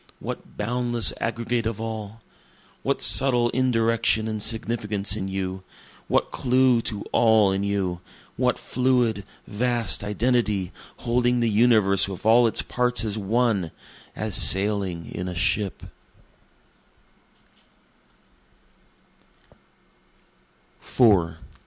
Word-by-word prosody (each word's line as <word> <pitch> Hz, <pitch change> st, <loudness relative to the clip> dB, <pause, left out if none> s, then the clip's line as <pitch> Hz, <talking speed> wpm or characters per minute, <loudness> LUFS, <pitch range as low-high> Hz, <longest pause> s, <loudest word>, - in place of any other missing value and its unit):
what -, -, -8 dB
boundless 120 Hz, -3 st, +1 dB
aggregate 115 Hz, 0 st, -2 dB
of 115 Hz, -2 st, -5 dB
all? 110 Hz, -1 st, -7 dB, 0.6 s
What -, -, -2 dB
subtle 125 Hz, -3 st, +4 dB
indirection 115 Hz, -3 st, 0 dB
and 110 Hz, -1 st, -4 dB
significance 110 Hz, -3 st, -1 dB
in 95 Hz, -3 st, -4 dB
you? 95 Hz, -1 st, -4 dB, 0.5 s
what -, -, 0 dB
clue 125 Hz, -1 st, +2 dB
to 105 Hz, -2 st, -6 dB
all 110 Hz, -4 st, +3 dB
in 95 Hz, +1 st, -2 dB
you? 95 Hz, -3 st, -2 dB, 0.3 s
what -, -, 0 dB
fluid, 125 Hz, -5 st, 0 dB, 0.2 s
vast 120 Hz, 0 st, 0 dB
identity, 105 Hz, -3 st, -1 dB, 0.3 s
Holding 120 Hz, +1 st, +1 dB
the 115 Hz, -1 st, +1 dB
universe 105 Hz, -4 st, +3 dB
with 95 Hz, +1 st, -9 dB
all 115 Hz, +2 st, +5 dB
its 110 Hz, -, 0 dB
parts 125 Hz, -1 st, 0 dB
as 105 Hz, -2 st, -3 dB
one 110 Hz, -3 st, 0 dB, 0.5 s
as -, -, -4 dB
sailing 95 Hz, -4 st, +3 dB
in 90 Hz, -, -6 dB
a 90 Hz, -, -6 dB
ship? 100 Hz, +2 st, -1 dB
110 Hz, 100 wpm, -23 LUFS, 100-120 Hz, 0.6 s, all